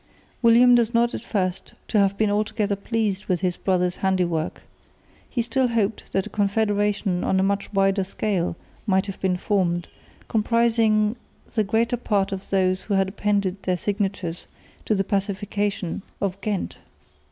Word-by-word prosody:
William 240 +1 +6
does 235 -1 +3
not 235 +1 +3
seem - - -4
at - - -17
first 185 -5 -2
to 215 - +2
have 200 0 +2
been 215 -1 +2
altogether 210 0 0
pleased 210 -1 -1
with 180 -2 0
his 180 -2 0
brother's 180 -2 0
handiwork. 180 -4 0 0.7
He 240 - -1
still 250 +3 +1
hoped 225 -3 -1
that 195 - 0
a - - -7
confederation 205 -2 +1
on 190 - +2
a - - +3
much 200 +1 -1
wider 195 -1 +2
scale 185 -2 -1 0.3
might 190 -1 +3
have 195 -2 -7
been 185 -1 +1
formed, 175 -3 0 0.4
comprising 225 -1 +2 0.4
the 220 - +2
greater 230 +4 +1
part 200 -4 0
of 195 0 -6
those 185 -1 +2
who 200 - -1
had 195 0 +2
appended 200 -1 -1
their 185 -1 0
signatures 195 -3 -2 0.4
to 215 - +2
the 195 - +1
Pacification 200 -1 -2 0.2
of 195 -1 -2
Ghent. 205 -3 -3
200 Hz, 160 wpm, -24 LUFS, 190-215 Hz, 0.7 s, William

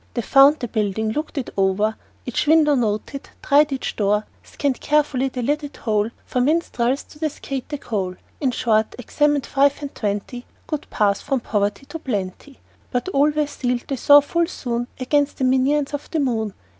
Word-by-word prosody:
They 235 - -1
found 275 +5 +6
the 240 - -2
building, 215 0 -1
looked 300 +5 -4
it 265 - -3
o'er, 200 +3 +1 0.3
Each 250 +4 -1
window 310 -1 +5
noted, 240 +2 -2
tried 290 +1 +4
each 270 - -3
door, 210 0 +1 0.2
Scanned 280 -3 -3
carefully 285 -3 +1
the 250 -1 -4
lidded 290 +2 -2
hole 215 -1 0 0.2
For 250 - -1
minstrels 270 -3 +1
to 300 - -17
cascade 280 -4 -4
the 295 - -3
coal 195 -8 -3 0.2
In 270 - +1
short, 220 -3 +1
examined 290 +3 +1
five 280 0 +2
and 285 -1 -6
twenty 210 +4 -4 0.2
Good 305 -2 -5
paths 200 -2 +1
from 270 -3 -1
poverty 205 +4 -1
to 325 - -7
plenty. 215 +2 -5 0.3
But 250 +8 -2
all 290 -3 +3
were 300 0 0
sealed, 250 -4 -2
they 275 - 0
saw 290 +3 +7
full 335 +4 0
soon, 240 -7 -3
Against 285 +2 +1
the - - -2
minions 270 +3 +2
of 290 - -5
the 320 - -1
moon. 225 -7 -1
265 Hz, 180 wpm, -22 LUFS, 220-290 Hz, 0.3 s, saw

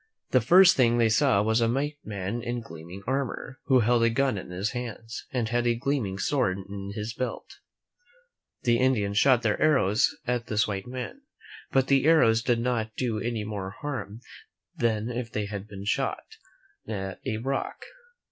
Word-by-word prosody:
The 130 - +4
first 180 - +7
thing 120 -2 +3
they 115 -1 +4
saw 110 -2 +3
was 110 +2 +2
a 115 - +3
white 145 +3 -2
man 100 +2 -4
in 120 +1 -3
gleaming 85 0 -10
armor, 130 0 -3
who 130 -3 +4
held 120 +1 +3
a 115 - +4
gun 130 +1 +1
in 95 - -6
his 95 +4 -2
hands, 120 -2 -6
and 120 -4 -1
had 120 +1 +1
a 120 - +3
gleaming 120 -6 -1
sword 100 -4 +1
in 100 0 -7
his 110 +1 -4
belt. 130 +2 -5 1.0
The 120 -1 +3
Indians 105 -6 +2
shot 130 -2 +4
their 110 -2 0
arrows 130 -9 +3
at 125 -1 -1
this 105 0 +1
white 100 -1 -4
man, 130 - -6 0.5
but 135 -1 +3
the 135 0 +3
arrows 115 -9 +5
did 120 0 +1
not 115 -2 -1
do 115 -4 -1
any 115 -2 -2
more 105 -2 -5
harm 130 -6 -5 0.5
than 115 0 0
if 120 -1 -4
they 105 -1 -2
had 100 0 -6
been 100 -1 -9
shot - - -1 0.6
at 95 -3 -4
a 110 - -2
rock. 135 +4 -3
115 Hz, 175 wpm, -27 LUFS, 105-130 Hz, 1.0 s, first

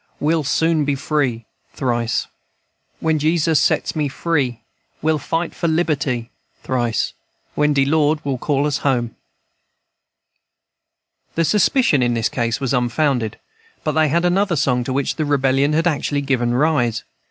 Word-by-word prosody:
We'll 155 +1 +1
soon 160 +2 +1
be 145 -1 0
free 135 -5 -1 0.3
(Thrice.) 120 -3 -1 0.8
When 160 -1 +1
Jesus 160 0 +2
sets 155 - +1
me 150 -2 0
free. 135 -5 -1 0.4
We'll 155 0 +1
fight 165 +3 -2
for 170 - -2
liberty 145 -7 -1 0.3
(Thrice.) 120 -5 -1 0.4
When 150 0 +2
de 135 -1 +3
Lord 155 +1 +2
will 135 -3 -2
call 145 0 0
us 150 -2 0
home." 120 -4 0 2.2
The 165 - +2
suspicion 210 - +3
in 120 -1 +1
this 115 -1 0
case 115 +1 -1
was 135 -3 -1
unfounded, 125 -2 0 0.5
but 155 - 0
they 155 +1 +2
had 170 +4 +1
another 185 +1 +2
song 130 -4 +1
to 130 - -3
which 140 0 -1
the 155 - 0
Rebellion 140 0 +2
had 165 +2 +1
actually 145 -3 0
given 125 -3 0
rise. 125 -6 +1
145 Hz, 145 wpm, -20 LUFS, 125-155 Hz, 2.2 s, de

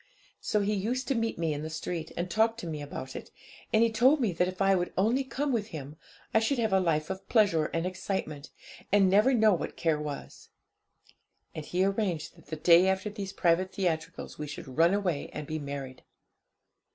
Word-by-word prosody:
So 210 - 0
he 205 +1 0
used 230 +6 -2
to - - +3
meet 230 -2 -1
me 165 -2 0
in 145 - -4
the 155 - -5
street, 160 0 -4
and 175 +1 -1
talk 225 +4 +2
to 230 - -7
me 155 -3 -4
about 135 -2 -7
it, - - -7 0.4
and 220 0 +4
he 230 - +2
told 255 +7 +4
me 230 -7 +1
that 180 +1 +1
if 185 0 -6
I 195 0 +4
would 180 -1 0
only 230 +8 +2
come 275 +2 -2
with 215 -3 -1
him, 150 -6 -8 0.4
I 220 - +5
should 240 +5 0
have 220 -4 0
a 190 - +5
life 165 -2 0
of 190 0 -7
pleasure 195 -9 +3
and 165 +1 -2
excitement, 185 -5 -4 0.4
and 195 -2 +5
never 210 +7 +5
know 220 -4 +5
what 175 - -4
care 160 -3 +1
was. 145 -2 -7 1.0
And 155 - -6
he 180 +1 +1
arranged 195 -7 -1
that 165 - -19
the 160 - -4
day 170 +3 +6
after 190 +2 0
these 200 -2 -5
private 185 0 +1
theatricals 165 -6 -3
we 150 - -4
should 135 -2 -8
run 170 +4 +4
away 180 -8 -1
and 150 - -5
be 155 +2 -4
married. 140 -2 -6
185 Hz, 210 wpm, -29 LUFS, 160-215 Hz, 1.0 s, day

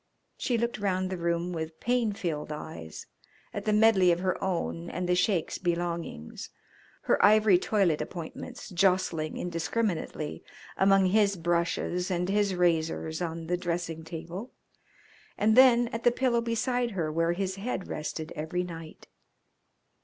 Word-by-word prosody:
She 245 - 0
looked 235 -1 -1
round 185 -2 0
the 185 - -2
room 170 +1 -1
with 160 -1 -5
pain 240 -2 +1
filled 160 -7 -3
eyes, 150 - -7 0.5
at - - -5
the 215 - +2
medley 210 -4 +5
of 170 - +1
her 185 -1 -1
own 170 -2 -2
and 180 +1 -3
the 180 - +3
Sheik's 180 -1 +1
belongings, 170 - -3 0.5
her - - +2
ivory 210 -3 +6
toilet 185 -7 +1
appointments 170 +3 -7
jostling 180 -4 +1
indiscriminately 170 -2 -2 0.3
among 195 0 +4
his 200 +1 +3
brushes 175 +1 0
and 180 0 -1
his 200 -1 +2
razors 165 -2 0
on 165 -1 -3
the 175 +2 0
dressing 170 -2 -3
table, 170 +7 -7 0.9
and 215 +1 +3
then 245 -2 +7
at 230 0 -5
the - - +6
pillow 240 -1 +1
beside 240 +1 0
her 155 -3 0
where 165 +2 +1
his 190 +1 -2
head 200 -2 -3
rested 155 +1 -5
every 160 +4 -2
night. 165 -2 -9
180 Hz, 145 wpm, -28 LUFS, 165-205 Hz, 0.9 s, then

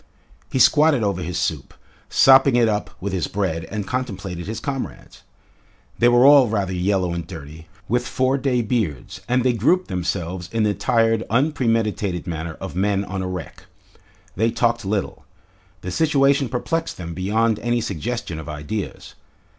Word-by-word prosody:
He - - -1
squatted 150 -1 +5
over 100 -3 -1
his 90 0 -4
soup, 80 -5 -3 0.3
sopping 135 -1 +6
it 120 -2 +4
up 105 -1 -1
with 100 +1 -4
his 90 -4 -1
bread, 85 -5 -2
and 105 +3 -5
contemplated 95 -9 -4
his 110 - -4
comrades. 135 -2 -6 0.8
They 120 - +5
were 120 +1 +5
all 140 -3 +8
rather 100 -4 -1
yellow 90 -1 0
and 85 -1 -5
dirty, 80 -2 -10 0.2
with 120 +2 0
four 130 +2 +1
day 125 -3 +1
beards, 105 - -2
and 125 0 +2
they 125 -1 +3
grouped 155 - +1
themselves 90 0 -3
in 115 -1 0
the 105 -1 +2
tired, 115 0 +1
unpremeditated 115 - 0
manner 80 -1 -4
of 95 -2 -7
men 100 +1 0
on 95 0 -4
a 95 - -3
wreck. 90 -2 -7 0.7
They 110 +4 +2
talked 120 -1 0
little. 100 0 -2 0.6
The 90 - -5
situation 140 - +2
perplexed 165 +7 -2
them 85 -2 -6
beyond 105 +5 0
any 120 0 0
suggestion 110 -3 -4
of 80 - -8
ideas. 75 +7 -5
105 Hz, 160 wpm, -22 LUFS, 90-125 Hz, 0.8 s, all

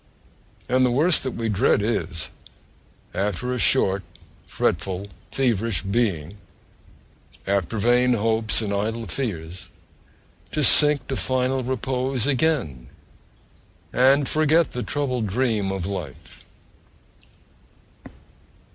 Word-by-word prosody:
And 130 +1 +2
the 125 - +3
worst 155 +8 +3
that 130 - -4
we 115 -1 -3
dread 100 -1 +2
is, 85 -7 -3 0.8
after 105 +6 -2
a 125 - -3
short, 100 -7 +3 0.5
fretful, 95 0 -2 0.2
feverish 115 -8 0
being, 100 -5 -1 1.1
after 100 +1 -1
vain 125 +3 +3
hopes 110 0 +1
and 100 -1 -2
idle 110 +3 -2
fears, 90 -5 -4 0.8
to 150 - 0
sink 150 -2 +6
to 135 - -1
final 130 0 0
repose 130 -1 -2
again, 130 - 0 1.1
and 135 +3 +4
forget 155 +1 +2
the 125 - -4
troubled 125 -5 -2
dream 110 -2 0
of 95 -3 -4
life!... 90 -9 -7
115 Hz, 100 wpm, -23 LUFS, 100-130 Hz, 1.1 s, sink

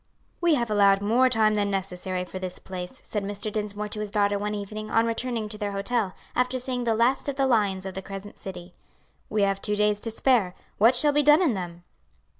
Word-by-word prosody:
"We 340 -3 +4
have 235 -5 -1
allowed 200 -1 +4
more 245 +5 +4
time 220 -3 +3
than 205 -1 +1
necessary 185 -1 -3
for 185 - -7
this 185 -1 -4
place," 185 +6 -7
said 210 -2 -3
Mr. 205 +1 -3
Dinsmore 210 0 -2
to 210 - -4
his 210 -1 -3
daughter 205 0 +1
one 210 +1 -2
evening 215 +1 -6
on 225 0 +3
returning 230 -1 -2
to 210 0 -6
their 205 -2 -2
hotel, 200 0 -1 0.2
after 250 +1 +1
seeing 250 -1 -2
the 225 -1 +2
last 245 +5 +2
of 280 - -3
the 270 0 +2
lions 205 -7 +1
of 190 - -5
the 190 - -5
Crescent 195 +1 -9
City; 180 -2 -8 0.6
"we 210 -1 +1
have 195 0 +1
two 210 - 0
days 210 0 +2
to 230 - -3
spare; 225 -5 +2 0.2
what 230 +5 +6
shall 290 +4 +3
be 295 - +4
done 295 +5 +6
in 300 -9 +2
them?" 175 -3 -6
210 Hz, 225 wpm, -26 LUFS, 195-235 Hz, 0.6 s, what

